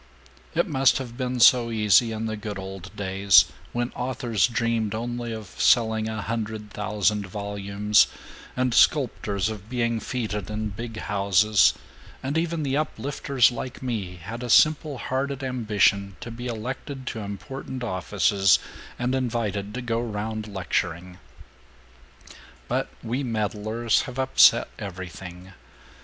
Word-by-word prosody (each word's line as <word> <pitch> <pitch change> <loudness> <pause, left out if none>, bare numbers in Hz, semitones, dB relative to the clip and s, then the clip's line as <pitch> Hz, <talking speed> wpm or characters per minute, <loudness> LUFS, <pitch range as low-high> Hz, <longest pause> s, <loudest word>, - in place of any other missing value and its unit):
It 170 - +3
must 135 -5 +3
have 125 -3 -6
been 125 -1 -2
so 120 0 +6
easy 110 0 +4
in 110 0 -3
the 110 -1 -2
good 105 -1 -6
old 95 -1 -7
days 95 -2 +5 0.3
when 120 +1 -2
authors 125 -5 0
dreamed 115 -3 -1
only 120 +1 -4
of 110 -5 -7
selling 110 -2 +3
a 110 -1 -4
hundred 110 -1 -4
thousand 105 -1 0
volumes, 100 +1 +1 0.5
and 125 -1 +1
sculptors 100 - +2
of 110 -1 -6
being 115 -2 0
feted 105 -6 -3
in 105 0 -3
big 115 +2 -7
houses, 100 0 +3 0.5
and 135 +3 -2
even 165 -1 0
the 135 -1 0
Uplifters 140 -4 +1
like 125 +2 -6
me 105 -8 -3
had 100 +8 -7
a 125 - -5
simple 155 +2 +4
hearted 135 +2 -2
ambition 105 -6 +1
to 120 - -7
be 120 +2 -6
elected 130 +4 -5
to 115 - -4
important 125 +5 -6
offices 95 0 +2 0.4
and 125 +1 -1
invited 115 -6 -1
to 125 - -4
go 115 -1 -1
round 110 -1 -4
lecturing. 90 -2 -3 1.5
But - - -1
we 120 +4 -2
meddlers 110 -1 0
have 125 0 -8
upset 130 0 +5
everything. 90 0 -8
110 Hz, 135 wpm, -25 LUFS, 100-125 Hz, 1.5 s, so